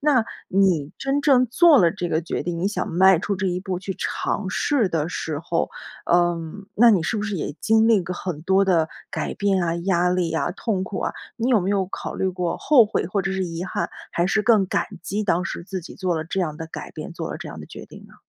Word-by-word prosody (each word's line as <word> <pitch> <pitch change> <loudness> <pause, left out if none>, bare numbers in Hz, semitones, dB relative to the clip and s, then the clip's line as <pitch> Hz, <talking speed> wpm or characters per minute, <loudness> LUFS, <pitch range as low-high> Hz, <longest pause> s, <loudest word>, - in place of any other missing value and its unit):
那 280 -5 +3 0.3
你 180 -6 +2
真 275 +1 0
正 255 -4 +5
做 305 +5 +6
了 170 -5 +5
这 180 0 -4
个 160 - +1
决 170 - -3
定， 170 -1 -3
你 185 +4 +1
想 210 - -2
迈 190 +1 +5
出 200 - -2
这 190 - -1
一 180 0 -1
步 185 -2 -3
去 190 +1 -5
尝 195 -2 -2
试 245 +1 +1
的 160 -2 -1
时 160 -4 -3
候， 170 0 -1 0.4
嗯， 175 +2 +1
那 235 +2 +7
你 195 -6 +3
是 165 - -1
不 210 - -2
是 205 -2 -2
也 150 - -4
经 220 0 +4
历 215 -5 +4
过 180 +1 -5
很 175 -4 -5
多 190 +3 +3
的 170 -4 +2 0.2
改 - - -3
变 195 -3 +1
啊、 165 -1 0
压 175 0 +1
力 180 -2 0
啊、 165 - 0
痛 195 0 -2
苦 190 - -5
啊？ - - -1 0.2
你 240 +2 -1
有 230 -6 +4
没 185 - -1
有 195 -2 +1
考 - - -6
虑 190 - 0
过 180 -2 -2
后 270 -6 +5
悔 205 - -1
或 195 +2 -1
者 195 - -2
是 190 -1 -1
遗 170 0 -4
憾， - - -2 0.2
还 170 - +1
是 210 +3 +1
更 215 -3 +4
感 - - 0 0.2
激 210 +3 -2
当 180 -3 +1
时 170 - -5
自 190 0 -5
己 170 - -11
做 185 -3 -1
了 160 - -3
这 190 +4 -2
样 155 -4 -2
的 160 0 -6
改 160 - -8
变、 - - -8
做 - - -5
了 - - -4
这 - - -7
样 - - -8
的 - - -9
决 - - -10
定 - - -13
呢？ - - -19
185 Hz, 270 characters per minute, -23 LUFS, 170-205 Hz, 0.4 s, 那